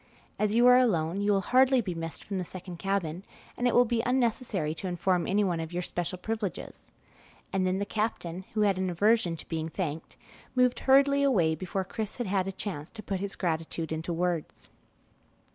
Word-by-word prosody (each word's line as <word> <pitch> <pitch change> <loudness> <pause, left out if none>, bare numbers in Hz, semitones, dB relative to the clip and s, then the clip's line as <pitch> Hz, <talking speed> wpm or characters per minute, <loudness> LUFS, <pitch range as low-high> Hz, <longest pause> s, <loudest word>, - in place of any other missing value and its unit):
As 210 0 +1
you 240 +1 +5
are 250 0 +8
alone, 185 -6 +1
you 205 0 +2
will 195 -1 +3
hardly 260 +4 +4
be 195 -6 -2
missed 165 -2 -6
from 195 -2 -3
the - - -1
second 180 0 -8
cabin, 190 -4 -1 0.3
and 245 - 0
it 245 - +1
will 245 - +6
be 230 0 0
unnecessary 235 - 0
to 165 +4 -6
inform 180 0 0
anyone 190 -4 +1
of 160 0 -5
your 175 +1 -2
special 175 +1 -3
privileges;" 215 0 -5 0.7
and 190 -1 +1
then 185 +1 +1
the 200 - -1
captain, 195 -5 -3
who 215 - +2
had 200 -3 +3
an 185 -1 0
aversion 185 -1 +2
to - - -10
being 160 -1 -3
thanked, 160 -3 -4 0.4
moved 250 -1 +3
hurriedly 280 +1 +4
away 195 -13 +3
before 185 +4 -3
Chris 215 +3 -5
had 245 - -3
had 190 -1 0
a - - -2
chance 185 -6 -5
to 215 -2 -10
put 195 -2 -2
his 200 +1 -4
gratitude 165 -2 -2
into 160 +2 -3
words. 170 -1 -2
190 Hz, 195 wpm, -29 LUFS, 170-220 Hz, 0.7 s, are